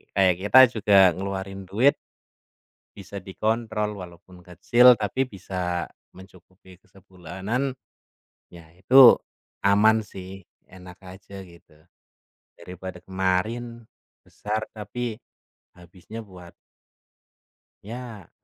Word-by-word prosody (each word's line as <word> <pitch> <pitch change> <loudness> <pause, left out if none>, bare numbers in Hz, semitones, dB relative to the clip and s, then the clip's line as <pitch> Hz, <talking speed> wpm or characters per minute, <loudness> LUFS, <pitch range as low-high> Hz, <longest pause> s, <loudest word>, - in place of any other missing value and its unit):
kayak 95 -2 +3
kita 105 +6 +5 0.2
juga 105 -1 +2 0.2
ngeluarin 95 0 -6
duit 120 +9 +3 1.0
bisa 100 0 -10
dikontrol. 110 +2 -3
Walaupun 90 0 -13
kecil, 120 +8 +4
tapi 125 +6 -2
bisa 90 -3 -4 0.3
mencukupi 95 0 -18
ke - - -35
sebulanan, 95 +7 -5 0.8
ya, 85 -2 -15
itu 120 +7 +7 0.5
aman 110 +3 +4
sih, 95 0 -11 0.3
enak 90 0 -14
aja, 95 +1 -12
gitu. 85 -3 -20 0.8
Daripada 90 0 -10
kemarin, 110 +6 -3 0.4
besar 110 +1 -5
tapi 110 +2 -6 0.6
habisnya 90 +5 -13
buat 90 -3 -15 1.3
ya 115 -4 -10
95 Hz, 90 wpm, -24 LUFS, 90-110 Hz, 1.3 s, itu